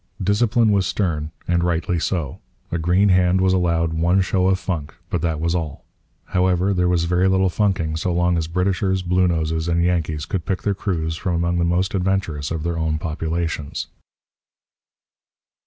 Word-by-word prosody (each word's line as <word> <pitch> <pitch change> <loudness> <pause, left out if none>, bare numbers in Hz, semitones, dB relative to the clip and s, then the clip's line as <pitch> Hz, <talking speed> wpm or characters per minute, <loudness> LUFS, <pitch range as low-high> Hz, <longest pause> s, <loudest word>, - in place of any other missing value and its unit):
Discipline 110 +3 +3
was 100 -2 +2
stern; 80 -6 -1 0.2
and 85 0 +1
rightly 85 0 0
so. 80 -5 -2 0.3
A 85 - -1
green 90 +5 +3
hand 90 0 +3
was 95 0 +3
allowed 85 -3 +1
one 85 +4 +2
show 95 0 +1
of 95 0 +3
funk; 80 -6 -4 0.2
but 90 - 0
that 80 -3 -1
was 85 +1 0
all. 80 -5 -4 0.4
However, 95 +1 +1
there 90 -1 +1
was 90 -2 +2
very 90 +2 +2
little 95 0 +3
funking 90 -4 0
so 90 +3 -1
long 85 0 +2
as 80 -2 -1
Britishers, 95 +2 0
Bluenoses, 85 -3 +1
and 85 0 +2
Yankees 80 -4 0
could 95 -4 -3
pick 95 -2 -2
their 100 - +1
crews 80 -5 -2
from 90 +1 -2
among 85 +1 0
the 85 - +2
most 90 +2 0
adventurous 90 -6 -1
of 80 -2 -3
their 85 0 -2
own 80 -1 0
populations. 80 -1 -3
90 Hz, 170 wpm, -21 LUFS, 80-95 Hz, 0.4 s, Discipline